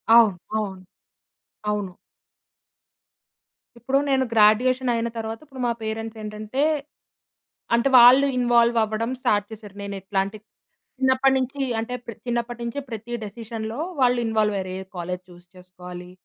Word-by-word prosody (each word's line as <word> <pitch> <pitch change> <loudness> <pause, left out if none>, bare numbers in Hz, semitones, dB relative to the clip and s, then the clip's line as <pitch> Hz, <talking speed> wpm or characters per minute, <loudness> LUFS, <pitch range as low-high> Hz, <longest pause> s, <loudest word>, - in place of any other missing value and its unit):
అవును. 215 -6 +6 0.2
అవును. 195 -3 -3 0.9
అవును. 205 -3 -2 1.9
ఇప్పుడు 265 +4 0
నేను 265 -1 +3
గ్రాడ్యుయేషనయిన 235 +2 +3
తర్వాత 225 0 -4
ఇప్పుడు 265 -3 -9
మా 235 - +2
పేరెంట్సేంటంటే, 220 +3 -3 1.1
అంటే 235 +4 +3
వాళ్ళు 255 +4 +8
ఇన్‌వాల్వ్ 240 -1 +4
అవ్వడం 220 +3 -2
స్టార్ట్ 205 -3 +1
చేశారు. 210 -2 -10
నేను 200 0 -5
ఎట్లాంటి 195 +2 -2 0.6
చిన్నప్పటి 260 +1 +4
నుంచి 260 +2 -3 0.2
అంటే, 250 +2 -4
ప్ర 230 - -5
చిన్నప్పటి 240 0 -2
నుంచి 235 +4 -4
ప్రతి 225 +2 -7
డెసిషన్‌లో 225 +2 -6 0.2
వాళ్ళు 245 -1 +4
ఇన్‌వాల్వయ్యారు. 210 -4 0
ఏ - - -5 0.2
కాలేజీ 180 +1 -4
చూజ్ 175 0 -16
చేసుకోవాలి, 180 0 -10
225 Hz, 120 wpm, -24 LUFS, 205-240 Hz, 1.9 s, వాళ్ళు